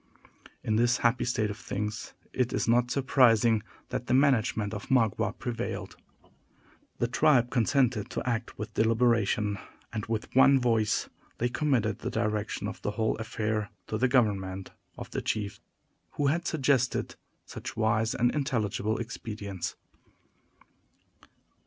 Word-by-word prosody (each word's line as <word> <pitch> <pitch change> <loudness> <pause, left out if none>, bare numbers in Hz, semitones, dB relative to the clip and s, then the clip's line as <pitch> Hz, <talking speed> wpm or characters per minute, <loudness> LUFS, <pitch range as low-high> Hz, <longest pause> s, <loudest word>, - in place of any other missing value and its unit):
In 110 -1 +1
this 120 +2 +3
happy 120 +1 +3
state 110 -3 0
of 100 - -8
things, 105 +2 -4 0.2
it 125 -2 0
is - - 0
not 120 +1 +3
surprising 120 -4 +4 0.3
that - - -4
the 125 - +3
management 115 -6 +2
of 105 - -6
Magua 115 -3 +2
prevailed. 120 -1 -4 1.0
The 120 - +1
tribe 125 0 +3
consented 120 -3 +2
to - - -4
act 115 -1 -2
with 105 +1 -6
deliberation, 110 -2 +2 0.3
and 110 - -2
with 110 +1 -3
one 135 +1 +7
voice 115 -4 +1 0.3
they 120 - 0
committed 120 -5 0
the - - -3
direction 105 -1 -2
of - - -7
the - - -1
whole 110 0 +1
affair 110 -1 -2 0.2
to 110 - -3
the 130 - +4
government 95 -7 0 0.3
of - - -8
the - - -2
chief 100 -2 -2 0.5
who 145 - -1
had 170 +5 +1
suggested 135 -4 +1 0.3
such - - -8
wise 110 0 +1
and 120 +1 +2
intelligible 110 -7 -1
expedients. 105 -5 -5
115 Hz, 135 wpm, -29 LUFS, 105-125 Hz, 1.0 s, one